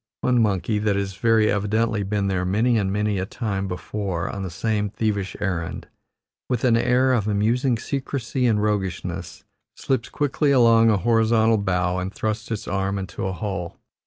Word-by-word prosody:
One 125 -2 +3
monkey, 105 0 +1
that 105 -1 +1
has 100 -1 -2
very 110 +2 +3
evidently 105 +2 0
been 100 0 -1
there 95 -2 0
many 110 +7 +2
and 95 -2 -1
many 105 -1 0
a 95 - -3
time 100 -5 -3
before 90 -1 -3
on 100 - -5
the 95 - -4
same 105 +3 -1
thievish 105 -2 -2
errand, 90 -5 -3 0.6
with 125 -3 -1
an 120 -3 +4
air 125 +2 +3
of 110 -4 0
amusing 115 +5 +1
secrecy 130 0 -2
and 105 -3 +2
roguishness, 100 -4 -3 0.3
slips 130 -3 -2
quickly 145 0 0
along 115 -4 +5
a 105 - +3
horizontal 115 0 +3
bough 90 -2 0
and 90 +1 -3
thrusts 110 0 -3
its 110 -3 -4
arm 95 +1 -1
into 95 0 -4
a - - -2
hole. 95 -3 -4
105 Hz, 170 wpm, -23 LUFS, 95-115 Hz, 0.6 s, along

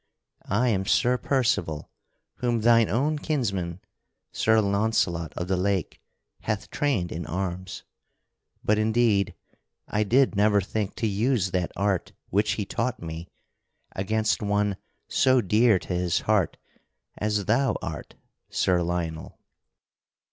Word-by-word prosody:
I 120 +6 +2
am 95 -3 0
Sir 125 +1 +3
Percival, 120 - 0 0.5
whom 120 -2 0
thine 115 -1 +5
own 145 +7 +1
kinsman, 100 - -2 0.5
Sir 110 0 +3
Launcelot 100 -6 +1
of 90 - -3
the 95 - +1
Lake, 95 -1 -1 0.4
hath 110 -2 -3
trained 110 - 0
in 80 -1 -5
arms. 90 +2 -4 0.8
But 105 0 +2
indeed, 110 -4 +2 0.5
I 105 - 0
did 125 +3 +3
never 105 0 +4
think 100 +1 -3
to 115 - -1
use 105 -1 +1
that 90 -1 -1
art 100 -1 -1 0.2
which 105 +3 +2
he 105 -3 -3
taught 120 +5 -2
me 85 +1 -7 0.7
against 110 +3 0
one 105 -1 +1 0.3
so 130 -1 +3
dear 110 +1 +4
to 90 - -5
his 90 -1 0
heart 105 -6 +1 0.6
as 105 -1 0
thou 130 +5 +2
art, 80 -4 -6 0.3
Sir 90 -1 +2
Lionel." 85 -2 -3
105 Hz, 125 wpm, -26 LUFS, 90-115 Hz, 0.8 s, thine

